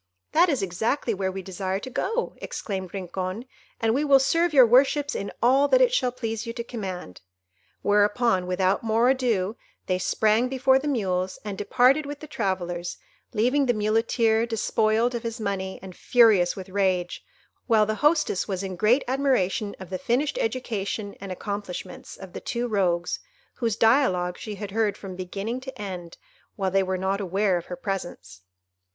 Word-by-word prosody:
"That 345 Hz, +3 st, +4 dB
is 270 Hz, -10 st, 0 dB
exactly 220 Hz, +7 st, -1 dB
where 190 Hz, -1 st, -2 dB
we 190 Hz, 0 st, -6 dB
desire 190 Hz, +1 st, -3 dB
to 205 Hz, -, -7 dB
go," 455 Hz, -, -1 dB
exclaimed 190 Hz, -4 st, -5 dB
Rincon, 185 Hz, +3 st, -4 dB, 0.3 s
"and 225 Hz, 0 st, +2 dB
we 280 Hz, +4 st, +1 dB
will 280 Hz, -2 st, +6 dB
serve 330 Hz, +6 st, +2 dB
your 265 Hz, -4 st, +7 dB
worships 275 Hz, +4 st, +3 dB
in 200 Hz, -, -4 dB
all 270 Hz, +4 st, +5 dB
that -, -, +4 dB
it -, -, +4 dB
shall 250 Hz, -, +2 dB
please 230 Hz, -2 st, -4 dB
you 230 Hz, -, -4 dB
to 235 Hz, -, -4 dB
command." 190 Hz, -, -6 dB, 0.6 s
Whereupon, 205 Hz, -1 st, +2 dB
without 185 Hz, +1 st, +1 dB
more 230 Hz, +3 st, +3 dB
ado, 230 Hz, -6 st, 0 dB, 0.3 s
they 185 Hz, -1 st, 0 dB
sprang 220 Hz, +5 st, +2 dB
before 265 Hz, 0 st, +3 dB
the 290 Hz, -, -4 dB
mules, 190 Hz, -8 st, -1 dB
and 205 Hz, -2 st, -4 dB
departed 255 Hz, +8 st, +3 dB
with 290 Hz, 0 st, -6 dB
the -, -, -9 dB
travellers, 180 Hz, -, -3 dB, 0.4 s
leaving 255 Hz, +6 st, +2 dB
the 245 Hz, -, +2 dB
Muleteer 225 Hz, +1 st, +2 dB
despoiled 225 Hz, +1 st, +1 dB
of 235 Hz, -, -3 dB
his 230 Hz, +1 st, -5 dB
money 195 Hz, -3 st, -3 dB
and 185 Hz, -2 st, -9 dB
furious 220 Hz, -8 st, +4 dB
with 190 Hz, -1 st, -8 dB
rage, 185 Hz, -2 st, 0 dB, 0.4 s
while 220 Hz, -3 st, +4 dB
the 215 Hz, -, -1 dB
hostess 300 Hz, -, +2 dB
was 195 Hz, -2 st, -3 dB
in 190 Hz, -1 st, -4 dB
great 225 Hz, +9 st, +3 dB
admiration 250 Hz, -7 st, 0 dB
of 190 Hz, -1 st, -10 dB
the 185 Hz, -, -3 dB
finished 265 Hz, -, 0 dB
education 215 Hz, -, -3 dB
and 195 Hz, -1 st, -6 dB
accomplishments 200 Hz, -1 st, -6 dB
of 190 Hz, -2 st, -11 dB
the -, -, -6 dB
two 240 Hz, 0 st, -2 dB
rogues, 180 Hz, -5 st, 0 dB, 0.3 s
whose 230 Hz, -4 st, -1 dB
dialogue 195 Hz, -8 st, +3 dB
she 215 Hz, -2 st, -6 dB
had 200 Hz, -1 st, -6 dB
heard 210 Hz, -1 st, 0 dB
from 190 Hz, -2 st, -8 dB
beginning 195 Hz, +7 st, -4 dB
to 265 Hz, -3 st, -9 dB
end, 180 Hz, -4 st, -6 dB, 0.4 s
while 190 Hz, -2 st, -1 dB
they 195 Hz, +1 st, +3 dB
were 190 Hz, 0 st, -1 dB
not 190 Hz, +2 st, -1 dB
aware 195 Hz, +1 st, +1 dB
of 175 Hz, -1 st, -3 dB
her 180 Hz, -, -5 dB
presence. 175 Hz, -, -6 dB
210 Hz, 175 wpm, -25 LUFS, 190-245 Hz, 0.6 s, your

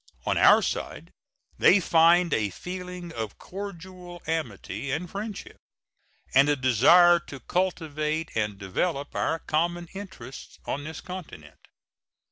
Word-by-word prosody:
On -, -, +1 dB
our -, -, +6 dB
side -, -, -4 dB, 0.5 s
they 195 Hz, -, +6 dB
find 170 Hz, -1 st, +4 dB
a 105 Hz, -2 st, +1 dB
feeling 180 Hz, -, -7 dB
of 110 Hz, -3 st, -5 dB
cordial 185 Hz, -2 st, -9 dB
amity 140 Hz, -6 st, -4 dB
and 170 Hz, +6 st, -2 dB
friendship, 205 Hz, +3 st, -7 dB, 0.8 s
and 140 Hz, +2 st, +6 dB
a 145 Hz, -, +3 dB
desire 170 Hz, -, +6 dB
to 135 Hz, -, -8 dB
cultivate 160 Hz, -3 st, -2 dB
and 105 Hz, -2 st, -1 dB
develop 140 Hz, -, -2 dB
our 160 Hz, -, 0 dB
common 170 Hz, +2 st, -1 dB
interests 190 Hz, -9 st, -9 dB
on 145 Hz, +1 st, -3 dB
this 160 Hz, 0 st, -7 dB
continent. 170 Hz, -, -10 dB
165 Hz, 120 wpm, -26 LUFS, 140-180 Hz, 0.8 s, our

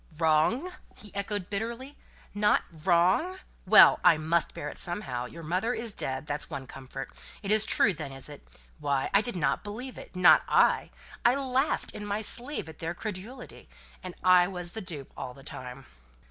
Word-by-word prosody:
"Wrong!" 165 Hz, -, +2 dB, 0.3 s
he 210 Hz, -, -13 dB
echoed, 200 Hz, -1 st, -3 dB
bitterly. 235 Hz, +7 st, -4 dB, 0.4 s
"Not 210 Hz, +1 st, +3 dB, 0.2 s
wrong? 185 Hz, -, +3 dB, 0.3 s
Well! -, -, +8 dB
I 170 Hz, -3 st, +6 dB
must 160 Hz, +2 st, 0 dB
bear 145 Hz, -, -5 dB
it -, -, -4 dB
somehow. 175 Hz, -9 st, -2 dB
Your 165 Hz, +5 st, -11 dB
mother 185 Hz, +9 st, -1 dB
is 230 Hz, -3 st, -4 dB
dead. 130 Hz, -4 st, -3 dB
That's 145 Hz, -1 st, -3 dB
one 140 Hz, -4 st, -6 dB
comfort. 135 Hz, 0 st, -8 dB, 0.3 s
It 200 Hz, -, -2 dB
is 215 Hz, 0 st, +4 dB
true, 205 Hz, -, +4 dB
then, 140 Hz, -, -7 dB
is 135 Hz, -1 st, -7 dB
it? 145 Hz, -1 st, -11 dB, 0.4 s
Why, 140 Hz, -2 st, -1 dB
I 200 Hz, -, +6 dB
didn't 175 Hz, -, -1 dB
believe 245 Hz, +5 st, -7 dB
it -, -, -13 dB
not 180 Hz, -1 st, +7 dB
I. -, -, +3 dB, 0.3 s
I 240 Hz, +2 st, +5 dB
laughed 270 Hz, +1 st, 0 dB
in 210 Hz, -, -8 dB
my 205 Hz, +1 st, -2 dB
sleeve 245 Hz, -, -1 dB
at 160 Hz, -, -11 dB
their 165 Hz, +1 st, -4 dB
credulity; 215 Hz, +6 st, -8 dB, 0.3 s
and 185 Hz, -1 st, -8 dB
I 180 Hz, -1 st, +6 dB
was 180 Hz, -2 st, -5 dB
the 220 Hz, -, -5 dB
dupe 160 Hz, -8 st, -7 dB
all 125 Hz, -, -7 dB
the 135 Hz, -, -14 dB
time!" 130 Hz, -2 st, -8 dB
185 Hz, 175 wpm, -28 LUFS, 150-215 Hz, 0.4 s, Well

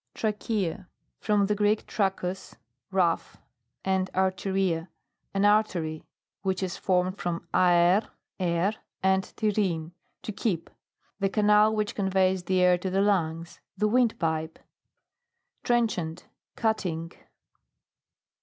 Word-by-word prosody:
TRACHEA. 210 Hz, -4 st, -2 dB, 0.3 s
From 205 Hz, -2 st, +2 dB
the 210 Hz, -, +1 dB
Greek, 210 Hz, +1 st, +1 dB
trachus, 190 Hz, -2 st, -2 dB, 0.3 s
rough, 180 Hz, -3 st, 0 dB, 0.5 s
and 190 Hz, -1 st, +1 dB
or/eria, 190 Hz, -2 st, 0 dB, 0.5 s
an 195 Hz, +1 st, +3 dB
artery, 185 Hz, -7 st, +1 dB, 0.4 s
which 190 Hz, -1 st, -1 dB
is 185 Hz, -2 st, -3 dB
formed 185 Hz, +1 st, 0 dB
from 170 Hz, -1 st, -3 dB
aer, 180 Hz, +3 st, +4 dB, 0.3 s
air, 175 Hz, +2 st, +1 dB, 0.3 s
and 190 Hz, 0 st, +3 dB
terein, 190 Hz, -7 st, 0 dB, 0.3 s
to -, -, -4 dB
keep. 195 Hz, -5 st, -2 dB, 0.5 s
The 195 Hz, -1 st, +1 dB
canal 210 Hz, +1 st, +4 dB
which 210 Hz, -1 st, -1 dB
conveys 190 Hz, -2 st, +1 dB
the 185 Hz, -1 st, +2 dB
air 180 Hz, -1 st, +4 dB
to 190 Hz, -, -3 dB
the 190 Hz, +1 st, +1 dB
lungs. 165 Hz, -5 st, 0 dB, 0.2 s
The 210 Hz, -, +2 dB
windpipe. 165 Hz, -10 st, +1 dB, 1.1 s
TRENCHANT. 195 Hz, -9 st, 0 dB, 0.3 s
Cutting. 180 Hz, -7 st, -1 dB
190 Hz, 105 wpm, -27 LUFS, 175-210 Hz, 1.1 s, aer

